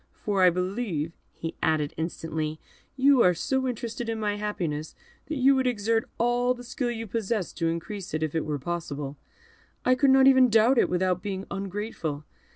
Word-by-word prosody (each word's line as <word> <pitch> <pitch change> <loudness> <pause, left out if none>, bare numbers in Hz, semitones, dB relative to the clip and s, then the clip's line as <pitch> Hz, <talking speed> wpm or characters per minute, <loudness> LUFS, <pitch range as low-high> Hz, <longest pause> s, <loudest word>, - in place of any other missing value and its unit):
for 200 -2 -1
I 185 - +8
believe," 180 -3 -2 0.2
he 165 - -6
added, 155 -2 +1
instantly, 160 -1 -3 0.4
"you 270 -1 +5
are 180 -4 +5
so 265 +9 0
interested 235 -1 -4
in 225 -1 -2
my 210 -1 0
happiness, 170 -8 -3 0.3
that 310 - -3
you 265 +1 +5
would 260 -1 +1
exert 225 +1 0
all 245 +1 +2
the 245 - -10
skill 245 0 -3
you 225 -1 -4
possess 215 -2 -2
to 165 - -1
increase 180 +4 -5
it, 155 - -1
if 155 - -2
it 160 -2 0
were 150 -1 -2
possible. 145 -2 -5 0.7
I 255 - +5
could 270 +2 +3
not 265 0 +6
even 260 -2 +7
doubt 225 +3 +5
it, - - +3
without 180 0 +1
being 195 -1 -4
ungrateful. 195 -6 -4
205 Hz, 180 wpm, -27 LUFS, 165-240 Hz, 0.7 s, I